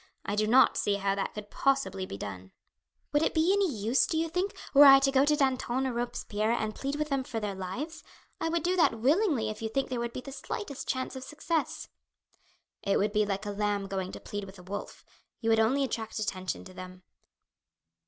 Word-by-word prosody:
I 205 Hz, -, -1 dB
do 215 Hz, 0 st, +1 dB
not 255 Hz, +4 st, +5 dB
see 205 Hz, -, +1 dB
how 200 Hz, 0 st, 0 dB
that 195 Hz, 0 st, -3 dB
could 210 Hz, -1 st, -8 dB
possibly 270 Hz, -9 st, 0 dB
be -, -, -6 dB
done." 95 Hz, -2 st, -7 dB, 0.6 s
"Would 295 Hz, -, +4 dB
it -, -, +1 dB
be 325 Hz, +4 st, +4 dB
any 400 Hz, -2 st, +2 dB
use, 225 Hz, +2 st, +2 dB
do 320 Hz, -, -1 dB
you 325 Hz, +1 st, 0 dB
think, 360 Hz, +4 st, -1 dB, 0.2 s
were 290 Hz, +1 st, +9 dB
I 275 Hz, -1 st, +10 dB
to 270 Hz, 0 st, +2 dB
go 270 Hz, +1 st, +4 dB
to 300 Hz, +1 st, +3 dB
Danton 265 Hz, -2 st, 0 dB
or 260 Hz, -, -1 dB
Robespierre 235 Hz, -3 st, -2 dB
and 215 Hz, -2 st, -1 dB
plead 275 Hz, +4 st, -3 dB
with 300 Hz, 0 st, -2 dB
them 275 Hz, -2 st, 0 dB
for 230 Hz, -3 st, -4 dB
their 210 Hz, -2 st, -3 dB
lives? 195 Hz, -, -5 dB, 0.4 s
I 325 Hz, -, -1 dB
would 335 Hz, -1 st, 0 dB
do 360 Hz, +1 st, +1 dB
that 280 Hz, -9 st, +4 dB
willingly 280 Hz, -, +2 dB
if 215 Hz, -, -9 dB
you 220 Hz, -, -2 dB
think 270 Hz, +4 st, -1 dB
there 250 Hz, -, -1 dB
would 235 Hz, 0 st, -2 dB
be -, -, -5 dB
the 275 Hz, -, -9 dB
slightest 280 Hz, -, -6 dB
chance 260 Hz, +1 st, -2 dB
of 260 Hz, -, -6 dB
success." 310 Hz, +2 st, -2 dB, 0.9 s
"It 200 Hz, -, +1 dB
would 205 Hz, +1 st, +1 dB
be 210 Hz, -1 st, +2 dB
like 200 Hz, +1 st, -2 dB
a 205 Hz, -, -2 dB
lamb 205 Hz, -1 st, -1 dB
going 190 Hz, -1 st, -3 dB
to -, -, -7 dB
plead 205 Hz, -1 st, -5 dB
with 190 Hz, 0 st, -12 dB
a 180 Hz, -, -13 dB
wolf. 195 Hz, +3 st, -7 dB, 0.3 s
You 225 Hz, -1 st, +1 dB
would 225 Hz, -, +4 dB
only 255 Hz, +6 st, +3 dB
attract 225 Hz, -4 st, -3 dB
attention 185 Hz, -3 st, -3 dB
to 185 Hz, -, -11 dB
them." 185 Hz, 0 st, -10 dB
235 Hz, 225 wpm, -29 LUFS, 205-280 Hz, 0.9 s, I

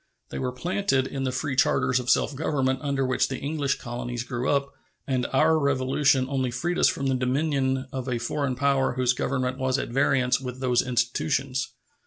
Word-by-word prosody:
They -, -, -4 dB
were 130 Hz, -1 st, -1 dB
planted 170 Hz, -1 st, 0 dB
in 135 Hz, 0 st, -4 dB
the 130 Hz, -, 0 dB
free 135 Hz, +2 st, -2 dB
charters 130 Hz, -1 st, +2 dB
of 125 Hz, 0 st, -4 dB
self 145 Hz, -, +3 dB
government 135 Hz, -3 st, 0 dB
under 140 Hz, -2 st, 0 dB
which 130 Hz, 0 st, +1 dB
the 130 Hz, -, -4 dB
English 145 Hz, -1 st, -1 dB
colonies 120 Hz, 0 st, -5 dB
grew 125 Hz, +1 st, -3 dB
up, 140 Hz, -1 st, +1 dB, 0.3 s
and 130 Hz, -3 st, 0 dB
our 155 Hz, +4 st, +4 dB
Revolution 135 Hz, -1 st, +2 dB
only 130 Hz, -2 st, -1 dB
freed 165 Hz, +9 st, -2 dB
us -, -, +5 dB
from 140 Hz, -, -1 dB
the 135 Hz, -, +2 dB
dominion 130 Hz, 0 st, 0 dB
of 130 Hz, -1 st, -4 dB
a 125 Hz, -, 0 dB
foreign 130 Hz, +3 st, -2 dB
power 135 Hz, 0 st, +1 dB
whose 125 Hz, 0 st, +2 dB
government 130 Hz, 0 st, -2 dB
was 130 Hz, 0 st, +1 dB
at -, -, -3 dB
variance 130 Hz, 0 st, +2 dB
with 125 Hz, -1 st, -6 dB
those 125 Hz, -2 st, +2 dB
institutions. 130 Hz, +1 st, -1 dB
130 Hz, 190 wpm, -26 LUFS, 125-140 Hz, 0.3 s, us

